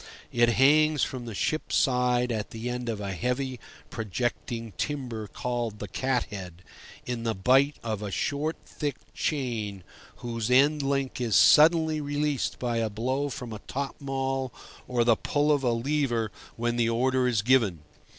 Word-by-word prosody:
It 120 0 +4
hangs 150 +4 +4
from 125 -2 -3
the 115 -3 -6
ship's 155 +10 -1
side 125 -2 +2
at 110 -2 -3
the 115 +2 -4
end 125 -1 -4
of 110 -2 -3
a 100 -1 -3
heavy, 125 +5 -2 0.3
projecting 115 +1 -3
timber 120 -5 -4
called 120 -1 -3
the 105 - -6
cat 130 +5 0
head, 90 -3 -8 0.4
in 120 -2 -3
the 115 -1 -1
bight 135 +9 +4
of 110 -3 -3
a 105 - -4
short, 145 - -1
thick 145 -4 -3 0.2
chain 110 - -2 0.3
whose 115 -1 -4
end 145 +4 +4
link 135 -2 -1
is 115 -5 +1
suddenly 160 0 +6
released 145 -1 -1
by 120 -2 -1
a 115 -1 0
blow 130 +7 -1
from 125 -3 -6
a 105 - -6
top 140 +1 -3
maul 135 -2 -2 0.4
or 120 -2 +2
the 115 -1 +5
pull 145 +5 +1
of 145 -2 +3
a 125 - +2
lever 120 -3 0 0.2
when 120 +1 -1
the 115 -1 +2
order 130 +2 +2
is 115 -4 +1
given. 110 - +3
125 Hz, 165 wpm, -27 LUFS, 115-135 Hz, 0.4 s, suddenly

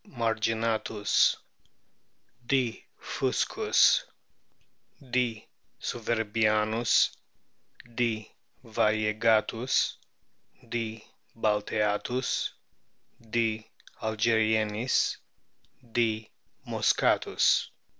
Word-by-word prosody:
marginatus, 110 -2 +1 1.1
D. 125 -2 -1
fuse - - -1
us, - - +4 1.1
D. 120 -3 -1 0.3
souverbiamis, 110 0 +1 0.8
D. 115 -3 -1 0.3
varie 110 -2 +1
gatus, 115 +3 +1 0.7
D. 115 -1 -4 0.3
balteatus, 105 +3 0 0.8
D. 110 -1 -1 0.3
algerienis, 110 +1 +1 0.8
D. 110 -2 0 0.4
mosckatus. - - +2
110 Hz, 50 wpm, -28 LUFS, 110-115 Hz, 1.1 s, us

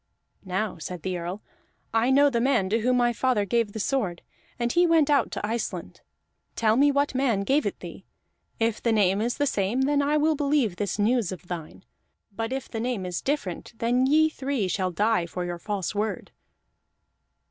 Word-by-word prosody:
"Now," 190 0 -2
said 175 +1 -6
the 185 -1 -2
Earl, 175 +4 -5 0.5
"I 225 +2 +2
know 280 +2 +5
the 235 -2 0
man 240 -7 +2
to 225 - +2
whom 250 +3 +2
my 240 -1 +2
father 240 -4 +1
gave 230 +1 0
the 220 - -5
sword, 210 -8 -1 0.3
and 240 -1 0
he 350 +4 +4
went 320 -3 +4
out 285 - +3
to - - -3
Iceland. 230 +2 -4 0.5
Tell 220 -1 +2
me 285 +4 +5
what 285 0 +1
man 255 -6 +1
gave 275 +9 +1
it - - -5
thee; - - -10 0.5
if 225 -1 0
the 235 - +1
name 200 -2 +3
is 235 +2 -1
the 290 - +1
same, 210 0 0
then 285 +2 +2 0.2
will 310 +2 +3
I - - +1
believe 280 -9 +1
this 205 -1 -2
news 220 -1 +1
of 180 -1 -9
thine. 170 +1 -7 0.5
But 225 +3 -3
if 265 0 -3
the 225 - -5
name 235 -5 -2
is 180 -1 -3
different, 255 - -3
then 245 +3 +2
ye 310 +3 +5
three 270 -8 -2
shall 185 +1 -1
die 205 -1 +1
for 180 +1 -4
your 175 -1 -4
false 200 -1 -3
word." 210 +1 -3
230 Hz, 195 wpm, -26 LUFS, 195-265 Hz, 0.5 s, know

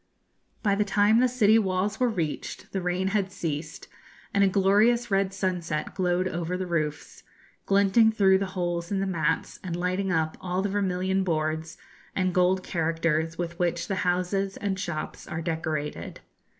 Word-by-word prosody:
By 200 -3 +3
the 205 +1 +2
time 205 +2 +3
the 255 - +5
city 225 -3 +4
walls 195 +1 -1
were 250 -1 +3
reached, 165 -9 -4
the 190 - -2
rain 180 +2 0
had 195 -2 0
ceased, 155 -4 -5 0.5
and 200 0 +4
a - - +5
glorious 205 +5 +3
red 195 0 +2
sunset 180 -5 -2
glowed 180 -1 +1
over 175 0 -2
the 185 - -3
roofs, 155 -4 -3 0.5
glinting 200 +3 +4
through 195 -3 +4
the 195 - -1
holes 175 0 -2
in 195 - 0
the 195 - 0
mats, 165 -4 -1
and 175 -3 -3
lighting 185 +2 -1
up 160 -3 0
all 185 +1 -1
the 200 - 0
vermilion 190 -1 0
boards 160 -2 -2 0.4
and 185 -1 +1
gold 185 +1 +2
characters 165 -1 0
with 170 -1 -4
which 170 -1 0
the 195 - -2
houses 185 +2 0
and 195 -2 -2
shops 170 -5 -5
are 160 - -4
decorated. 160 -3 -3
185 Hz, 165 wpm, -26 LUFS, 170-195 Hz, 0.5 s, the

